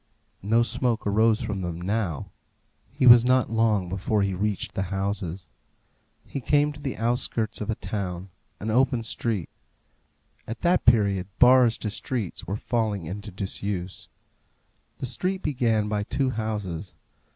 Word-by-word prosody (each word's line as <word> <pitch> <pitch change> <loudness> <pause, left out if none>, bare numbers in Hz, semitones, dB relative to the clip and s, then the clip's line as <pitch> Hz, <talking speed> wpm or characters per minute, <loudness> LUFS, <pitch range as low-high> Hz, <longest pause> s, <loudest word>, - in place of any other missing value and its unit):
No 115 +4 +3
smoke 120 -1 -1
arose 110 +2 +3
from 105 -5 -3
them 85 -2 -4
now. 95 -4 -2 0.6
He - - 0
was 120 -1 +9
not 125 -2 +2
long 110 -4 +2
before 100 +3 0
he 100 -1 0
reached 100 +2 -2
the - - -2
houses. 95 -2 -3 0.8
He 135 - -5
came 145 +3 +2
to 145 - -12
the 135 -3 -4
outskirts 115 -1 -1
of 105 - -4
a 110 - 0
town 95 -2 -5 0.3
an 110 +2 -3
open 125 0 +2
street. 110 -5 -2 1.0
At 115 - -6
that 175 +1 +2
period 100 -6 +4
bars 125 -2 +6
to 105 - -3
streets 110 -4 -4
were 100 - -2
falling 110 -6 -1
into 100 +6 -6
disuse. 95 -1 -4 0.9
The - - -4
street 185 +10 -2
began 115 -7 +1
by 105 -1 -1
two 130 +5 -1
houses. 105 -7 -4
110 Hz, 145 wpm, -25 LUFS, 95-120 Hz, 1.0 s, was